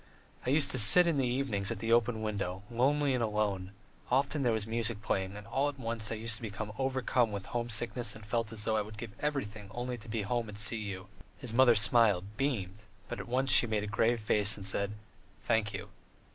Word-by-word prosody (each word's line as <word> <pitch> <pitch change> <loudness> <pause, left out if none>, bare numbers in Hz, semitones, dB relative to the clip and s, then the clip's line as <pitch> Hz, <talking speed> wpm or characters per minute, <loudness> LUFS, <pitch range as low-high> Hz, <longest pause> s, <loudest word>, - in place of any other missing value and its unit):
"I - - +2
used 145 +2 +4
to 130 - +1
sit 180 +11 +8
in 165 -4 +1
the 130 -2 +1
evenings 120 -6 -1
at 115 - -2
the 115 +3 -3
open 115 -1 +1
window, 100 -3 -3
lonely 140 +4 +1
and 125 - 0
alone; 105 -4 -1 0.4
often 140 +3 +1
there 125 -3 +2
was 110 -2 -1
music 115 -1 -1
playing, 95 +1 -2
and 105 - -10
all 135 +5 0
at 140 - -9
once 115 -3 -2
I - - -1
used 110 0 0
to - - -16
be 110 -3 -5 0.3
overcome 130 -3 0
with 100 -2 -5
homesickness 120 +1 -1
and 105 -1 -12
felt 115 +1 -2
as 110 -2 -1
though 110 0 0
I - - +1
would 105 +1 -9
give 115 0 -7
everything 110 -9 -3
only 120 +2 -5
to 115 +2 -13
be 110 0 -2
at - - -5
home 120 -1 -2
and 100 - -6
see 110 +2 +1
you." 95 -2 -6 0.3
His 125 -5 -7
mother 120 -1 +5
smiled, 110 -3 +4
beamed, 105 -8 -2 0.3
but 120 - -5
at - - -7
once 130 +2 0
she 120 - +8
made 110 -2 -1
a - - -3
grave 115 +3 +1
face 105 -1 +2
and 100 - -4
said: 100 +1 0 0.5
"Thank 110 -2 +1
you." 100 -2 -7
115 Hz, 230 wpm, -31 LUFS, 105-125 Hz, 0.5 s, sit